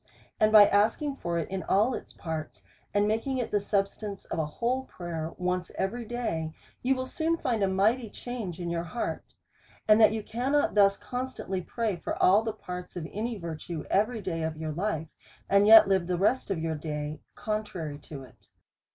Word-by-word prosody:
And 215 Hz, 0 st, +4 dB
by 210 Hz, -1 st, +10 dB
asking 225 Hz, +9 st, +2 dB
for 170 Hz, -6 st, -2 dB
it 165 Hz, -, -1 dB
in 190 Hz, 0 st, -3 dB
all 210 Hz, +9 st, +2 dB
its -, -, -6 dB
parts^ 160 Hz, -2 st, -6 dB, 0.3 s
and 205 Hz, 0 st, +2 dB
making 225 Hz, +5 st, 0 dB
it 245 Hz, -, -2 dB
the 205 Hz, -, +3 dB
substance 200 Hz, 0 st, -2 dB
of -, -, -4 dB
a 155 Hz, -, 0 dB
whole 250 Hz, +11 st, -1 dB
prayer 165 Hz, -5 st, -5 dB
once 180 Hz, 0 st, -1 dB
every 230 Hz, +5 st, -2 dB
day, 210 Hz, -10 st, -3 dB, 0.3 s
you 265 Hz, +2 st, +2 dB
will 255 Hz, 0 st, -3 dB
soon 320 Hz, +5 st, -1 dB
find 235 Hz, -8 st, -1 dB
a 195 Hz, -, +3 dB
mighty 215 Hz, +5 st, +2 dB
change 220 Hz, -8 st, -6 dB
in 170 Hz, -1 st, -3 dB
your 170 Hz, 0 st, -1 dB
heart; 205 Hz, +8 st, -4 dB, 0.5 s
and 215 Hz, +1 st, +6 dB
that 220 Hz, -, +7 dB
you 220 Hz, -1 st, -3 dB
cannot 265 Hz, +7 st, 0 dB
thus 200 Hz, -1 st, +5 dB
constantly 245 Hz, -4 st, -4 dB
pray 220 Hz, 0 st, -2 dB
for -, -, -4 dB
all 195 Hz, +4 st, +5 dB
the 225 Hz, 0 st, -2 dB
parts 180 Hz, -4 st, -8 dB
of 165 Hz, -3 st, -4 dB
any 225 Hz, +2 st, -3 dB
virtue 165 Hz, -2 st, -5 dB
every 215 Hz, +2 st, +1 dB
day 165 Hz, -3 st, -2 dB
of 160 Hz, -1 st, -2 dB
your 155 Hz, 0 st, -3 dB
life, 160 Hz, -2 st, -2 dB, 0.4 s
and 200 Hz, +1 st, +4 dB
yet 220 Hz, -1 st, +10 dB
live 190 Hz, -3 st, +2 dB
the 180 Hz, -1 st, 0 dB
rest 210 Hz, +8 st, +1 dB
of 195 Hz, -4 st, -1 dB
the 160 Hz, 0 st, -1 dB
day 150 Hz, -1 st, -4 dB, 0.2 s
contrary 185 Hz, -9 st, -4 dB
to 140 Hz, -2 st, -9 dB
it. 125 Hz, -4 st, -18 dB
200 Hz, 195 wpm, -28 LUFS, 170-225 Hz, 0.5 s, by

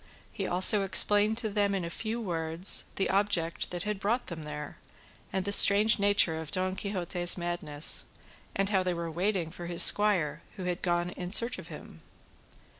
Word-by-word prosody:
He -, -, -4 dB
also 190 Hz, +3 st, +5 dB
explained 205 Hz, +3 st, +3 dB
to 225 Hz, -2 st, -1 dB
them 200 Hz, -1 st, 0 dB
in 185 Hz, -3 st, -3 dB
a 170 Hz, -, -6 dB
few 225 Hz, +5 st, -5 dB
words 165 Hz, -3 st, -1 dB
the 195 Hz, -, -1 dB
object 190 Hz, -4 st, -1 dB
that 175 Hz, -1 st, -5 dB
had 210 Hz, -2 st, -4 dB
brought 230 Hz, +5 st, -1 dB
them 165 Hz, -2 st, -7 dB
there, 150 Hz, -1 st, -8 dB, 0.5 s
and 190 Hz, -1 st, -3 dB
the 200 Hz, -, -2 dB
strange 205 Hz, +2 st, +5 dB
nature 200 Hz, -5 st, +2 dB
of 160 Hz, -, -9 dB
Don 185 Hz, +1 st, -2 dB
Quixote's 180 Hz, -3 st, 0 dB
madness, 170 Hz, -4 st, -2 dB, 0.5 s
and 195 Hz, 0 st, -1 dB
how 195 Hz, -3 st, +1 dB
they 180 Hz, -1 st, -2 dB
were 170 Hz, -1 st, -5 dB
waiting 180 Hz, -1 st, -2 dB
for 175 Hz, 0 st, -9 dB
his 170 Hz, -1 st, +3 dB
squire, 195 Hz, -8 st, +2 dB
who 190 Hz, -, -7 dB
had 180 Hz, -1 st, -4 dB
gone 175 Hz, 0 st, -1 dB
in 180 Hz, 0 st, -7 dB
search 235 Hz, +5 st, +2 dB
of -, -, -11 dB
him. -, -, -12 dB
185 Hz, 185 wpm, -28 LUFS, 170-205 Hz, 0.5 s, also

